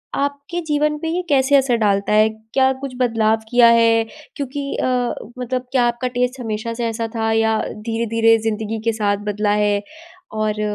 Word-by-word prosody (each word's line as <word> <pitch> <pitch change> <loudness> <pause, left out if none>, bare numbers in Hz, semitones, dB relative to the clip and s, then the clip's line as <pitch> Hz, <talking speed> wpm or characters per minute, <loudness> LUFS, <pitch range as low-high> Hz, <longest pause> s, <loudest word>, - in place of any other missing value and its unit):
आपके 285 +4 -3
जीवन 300 0 +1
पे 325 - -4
ये 350 +2 -1
कैसे 275 0 +3
असर 265 -3 +2
डालता 200 -1 +1
है? 215 +1 +5 0.2
क्या 265 -1 +4
कुछ 275 -2 -5
बदलाव 225 -3 +2
किया 245 0 +6
है 230 -1 +4 0.3
क्योंकि 280 0 -4
अ, - - -1 0.5
मतलब 250 0 -3
क्या 255 -2 +3
आपका 240 +1 -2
टेस्ट 250 +1 0
हमेशा 225 0 -3
से 240 0 -2
ऐसा 225 0 -3
था 225 0 0
या 220 0 +2 0.3
धीरे-धीरे 225 0 +2
ज़िंदगी 220 0 -2
के 230 - +3
साथ 205 -2 0
बदला 210 0 0
है? 205 -1 +1 0.5
और 215 -1 -1
230 Hz, 175 wpm, -20 LUFS, 220-265 Hz, 0.5 s, किया